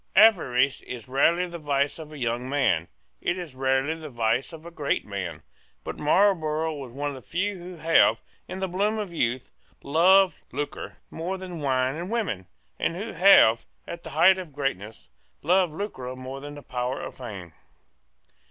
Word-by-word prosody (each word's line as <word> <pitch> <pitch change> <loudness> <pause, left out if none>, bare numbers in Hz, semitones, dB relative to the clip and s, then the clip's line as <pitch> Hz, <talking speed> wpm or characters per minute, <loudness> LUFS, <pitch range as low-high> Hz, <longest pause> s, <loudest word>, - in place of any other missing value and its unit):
Avarice 140 - +5
is 120 -4 -8
rarely 165 +7 +3
the 170 -1 -7
vice 145 0 0
of 155 -1 -9
a 150 - -9
young 120 0 -2
man: 130 - +1 0.3
it 175 - 0
is 175 -6 -7
rarely 135 +3 +1
the 160 -1 -8
vice 120 +2 0
of 165 -1 -11
a 170 - -8
great 150 -4 -1
man: 95 -4 -5 0.4
but - - -5
Marlborough 160 -2 +2
was 135 -5 -8
one 145 +3 -3
of - - -5
the 130 - -9
few 195 +7 -2
who 180 +1 -9
have, 165 0 +4 0.3
in - - -6
the 190 0 -2
bloom 200 +4 0
of 205 -5 -4
youth, 125 -4 -1 0.3
loved 185 +5 +5
lucre 145 - -5
more 180 +4 -3
than 185 -3 -7
wine 130 -2 +1
or 170 - -4
women, 185 - -2 0.3
and 165 - 0
who 210 +5 -5
have, 175 - +6 0.2
at 170 - -6
the - - -9
height 185 +4 +5
of 170 -6 -8
greatness, 110 - -4 0.4
loved 180 +2 +3
lucre 150 -8 -5
more 130 +1 -7
than 145 0 -8
power 125 0 -3
or - - -5
fame. 100 -9 -9
150 Hz, 175 wpm, -26 LUFS, 130-180 Hz, 0.4 s, have